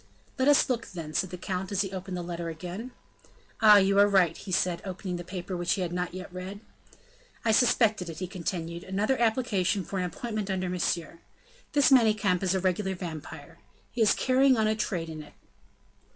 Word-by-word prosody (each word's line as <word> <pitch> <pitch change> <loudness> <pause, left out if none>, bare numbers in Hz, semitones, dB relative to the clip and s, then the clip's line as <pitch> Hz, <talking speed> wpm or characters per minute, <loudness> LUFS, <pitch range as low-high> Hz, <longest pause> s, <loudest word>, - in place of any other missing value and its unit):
"Let 260 - +2
us 290 -1 +5
look, 240 -3 -2
then," 165 -4 -7
said 185 - 0
the 180 - -7
count, 185 +1 -4
as 200 - +1
he 195 -2 -3
opened 185 -1 -5
the 175 - -4
letter 170 -1 -4
again. 180 +8 -6 0.7
"Ah! 210 -2 +9
you 195 0 +4
are 205 - +7
right," 185 -5 +3
he 195 - -9
said 180 -1 +1
opening 185 -1 -5
the 175 - -6
paper 180 +1 -6
which 175 -1 0
he 195 - -2
had 175 -1 -2
not 180 0 -3
yet 185 -1 -8
read. 185 +2 -7 0.9
"I 225 - +4
suspected 220 -5 +3
it," 160 - -7
he 185 - -3
continued 170 -2 -5
"another 210 +7 0
application 210 -5 +1
for 195 - -4
an 180 - 0
appointment 215 +3 -4
under 185 -1 -1
Monsieur. 170 -2 -2 0.5
This 285 -1 +4
Manicamp 215 -7 +4
is 190 -1 +1
a - - +1
regular 190 +1 0
vampire: 165 -4 -8 0.3
he 240 - -3
is 215 - +5
carrying 260 0 +3
on 220 - +2
a 215 0 +2
trade 180 -6 -2
in 155 -1 -7
it." 150 - -14
190 Hz, 200 wpm, -28 LUFS, 175-215 Hz, 0.9 s, Ah